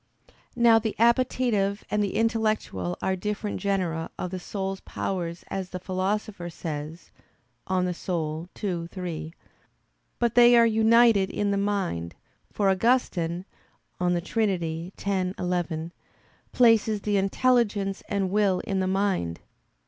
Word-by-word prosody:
Now 235 -1 +6
the 220 -1 -3
appetitive 235 -4 +2
and 210 0 +2
the 200 - -2
intellectual 215 - 0
are 190 - +1
different 210 +2 -3
genera 180 -5 -1
of 180 - -4
the 185 - -4
soul's 195 +1 -4
powers 170 -3 -4
as 190 -2 -4
the 185 - -5
Philosopher 190 0 -2
says 155 0 -6 0.6
(De - - -7
Anima 175 -3 -2 0.2
ii, 175 -4 -2
3), 170 -3 -6 0.8
but 235 -2 +1
they 240 0 +7
are 235 - +7
united 225 -2 +4
in 205 -1 -1
the - - +1
mind, 195 - -2 0.4
for 205 - 0
Augustine 185 -5 +1 0.5
(De 175 -1 +1
Trin. 175 -5 -1
x, 190 -2 -1
11) 175 -2 -2 0.6
places 225 -3 +4
the 205 -1 0
intelligence 200 -1 +1
and 195 -2 0
will 200 -3 +2
in 195 -4 -2
the 185 - 0
mind. 190 - 0
195 Hz, 125 wpm, -26 LUFS, 175-215 Hz, 0.8 s, they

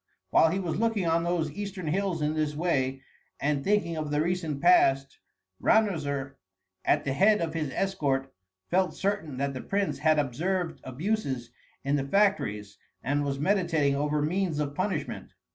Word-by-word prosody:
While 160 - +5
he 180 - -1
was 180 -2 -2
looking 225 -4 +1
on 165 0 +2
those 170 -3 0
eastern 195 +1 -5
hills 175 0 -1
in 150 +1 +1
this 155 -1 -1
way, 135 -5 0 0.4
and 140 -1 0
thinking 200 -5 +1
of 155 -1 -3
the 150 0 0
recent 165 -3 -1
past, 135 -5 +4 0.4
Ranuzer 145 -10 +1 0.5
at 145 - +2
the 135 - 0
head 210 +8 +4
of 165 -2 -2
his 155 -3 -2
escort 135 -7 -1 0.4
felt 180 -3 +2
certain 195 -9 -2
that 140 +1 -1
the 130 - -5
prince 200 0 -1
had 155 -1 +3
observed 165 +6 -1
abuses 135 - -2 0.3
in 140 +1 +1
the 135 - -1
factories 110 - 0 0.2
and 145 +2 0
was 140 -1 -2
meditating 165 -4 +2
over 150 +1 0
means 175 0 0
of 145 -1 -2
punishment. 185 +6 -3
155 Hz, 160 wpm, -28 LUFS, 140-185 Hz, 0.5 s, While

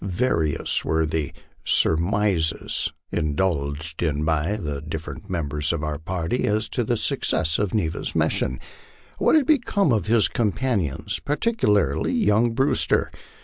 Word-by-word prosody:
Various 90 - 0
were 80 0 +1
the 80 -2 -2 0.3
surmi 100 +6 +2
ses 80 0 -1 0.2
indulged 75 0 -1
in 75 -3 0
by 80 +6 0
the 75 -8 -4
different 80 +5 -7
members 75 -4 -1
of 85 -2 -3
our 75 -1 -3
party 85 +7 -2
as 105 +1 0
to - - -1
the - - 0
success 80 0 0
of 105 0 -1
Ne 105 -7 +1
va's 80 - -5
mission. 65 +1 +1 0.6
What - - +4
had 305 -3 +4
become 235 - +2
of 110 -3 +1
his 115 -1 +4
companions, 105 - -1
particularly 105 - +1
young 110 +3 +2
Brew 135 +2 +2
ster? - - +2
85 Hz, 145 wpm, -23 LUFS, 80-110 Hz, 0.6 s, What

